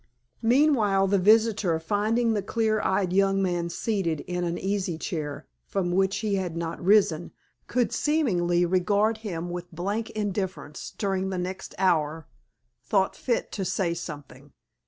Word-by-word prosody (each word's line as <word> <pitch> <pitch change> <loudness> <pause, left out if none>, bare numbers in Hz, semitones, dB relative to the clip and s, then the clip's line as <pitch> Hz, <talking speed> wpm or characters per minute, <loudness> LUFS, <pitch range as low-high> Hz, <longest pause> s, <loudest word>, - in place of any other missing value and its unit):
Meanwhile, 230 -6 +3
the 200 0 +3
visitor, 210 -4 +3
finding 215 +6 +1
that 210 - 0
the 195 - -17
clear 220 -2 +1
eyed 190 -1 0
young 195 0 +3
man 175 -3 0
seated 175 -4 -1
in 180 0 -3
an 170 0 -1
easy 190 -3 -2
chair 150 -5 -4 0.2
(from 180 -3 -1
which 190 +2 +2
he 210 - 0
had 180 -3 -3
not 170 0 -4
risen) 180 -4 +3 0.4
could 245 -1 +1
seemingly 180 - +2
regard 205 +5 +2
him 175 -5 -4
with 175 +1 -6
blank 200 +7 -3
indifference 195 -7 -4
during 190 -2 -1
the 190 - -3
next 185 +1 -5
hour, 160 -4 +1 0.6
thought 195 -2 +1
fit 240 -3 -1
to 195 - -3
say 180 -2 0
something. 145 -5 -9
190 Hz, 150 wpm, -26 LUFS, 175-210 Hz, 0.6 s, Meanwhile